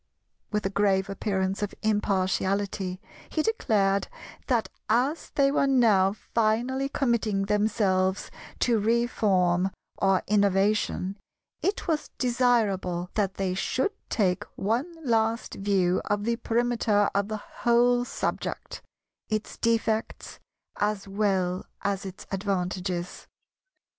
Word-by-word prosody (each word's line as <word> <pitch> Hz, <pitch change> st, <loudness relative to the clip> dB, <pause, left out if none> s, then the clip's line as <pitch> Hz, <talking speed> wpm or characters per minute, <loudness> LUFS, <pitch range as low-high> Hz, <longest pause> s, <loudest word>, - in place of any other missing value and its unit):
With 210 Hz, -1 st, -1 dB
a 195 Hz, -, 0 dB
grave 195 Hz, -1 st, +2 dB
appearance 195 Hz, -1 st, -1 dB
of 205 Hz, -, -3 dB
impartiality 195 Hz, -2 st, 0 dB, 0.3 s
he 310 Hz, -, 0 dB
declared 200 Hz, -, +1 dB, 0.4 s
that 240 Hz, -4 st, +1 dB, 0.2 s
as 255 Hz, +8 st, +1 dB
they 275 Hz, -1 st, +4 dB
were 280 Hz, -1 st, +2 dB
now 215 Hz, -8 st, +4 dB
finally 235 Hz, +5 st, 0 dB
committing 230 Hz, -8 st, 0 dB
themselves 200 Hz, -2 st, +1 dB, 0.3 s
to 235 Hz, -3 st, +3 dB
Reform 200 Hz, -5 st, +2 dB, 0.3 s
or 195 Hz, -1 st, +3 dB
Innovation, 200 Hz, -1 st, +1 dB, 0.4 s
it 395 Hz, -, -1 dB
was 310 Hz, -3 st, -1 dB
desirable 215 Hz, -8 st, +1 dB
that 195 Hz, -3 st, 0 dB
they 190 Hz, -2 st, -1 dB
should 260 Hz, -, 0 dB, 0.2 s
take 185 Hz, -5 st, +1 dB
one 235 Hz, -, -1 dB
last 225 Hz, -1 st, +1 dB
view 195 Hz, -2 st, +1 dB
of 205 Hz, 0 st, 0 dB
the 235 Hz, +1 st, 0 dB
perimeter 230 Hz, -3 st, +1 dB
of 200 Hz, 0 st, +1 dB
the 215 Hz, 0 st, -3 dB, 0.2 s
whole 245 Hz, +1 st, +4 dB
subject, -, -, -4 dB, 0.5 s
its 215 Hz, -1 st, -2 dB
defects 225 Hz, -1 st, -1 dB, 0.4 s
as 205 Hz, -1 st, -1 dB
well 195 Hz, -3 st, 0 dB, 0.2 s
as 200 Hz, -1 st, -1 dB
its 190 Hz, +1 st, -9 dB
advantages. 185 Hz, -2 st, -2 dB
205 Hz, 110 wpm, -27 LUFS, 195-235 Hz, 0.5 s, they